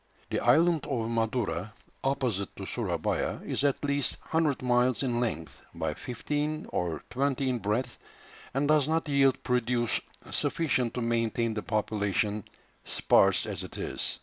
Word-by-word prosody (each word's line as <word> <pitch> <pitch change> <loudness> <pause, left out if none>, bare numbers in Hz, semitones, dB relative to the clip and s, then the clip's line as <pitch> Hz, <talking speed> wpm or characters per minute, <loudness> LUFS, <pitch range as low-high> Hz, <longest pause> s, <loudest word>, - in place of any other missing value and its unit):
The - - +1
island 160 +5 +4
of 115 -1 -1
Madura, 115 -4 -1 0.3
opposite 125 -8 0
to - - -6
Surabaya, - - -1
is - - -1
at 145 0 +1
least 140 -1 +1
100 155 -5 +1
miles 125 +1 +3
in 120 -3 0
length, 85 -10 -3
by 75 - -1
fifteen 145 - -3
or 85 -3 -2
twenty 135 +1 0
in 125 -2 0
breadth, 110 +5 -1 0.5
and 135 +2 0
does 150 -2 +4
not 160 0 +1
yield 140 -2 +3
produce 125 -1 +1 0.3
sufficient 130 -7 0
to 125 - -1
maintain 115 0 +1
the 105 - -2
population, 105 -1 0 0.4
sparse 95 +1 +4
as 100 -4 -4
it 90 - -9
is. - - -2
125 Hz, 145 wpm, -29 LUFS, 110-140 Hz, 0.5 s, island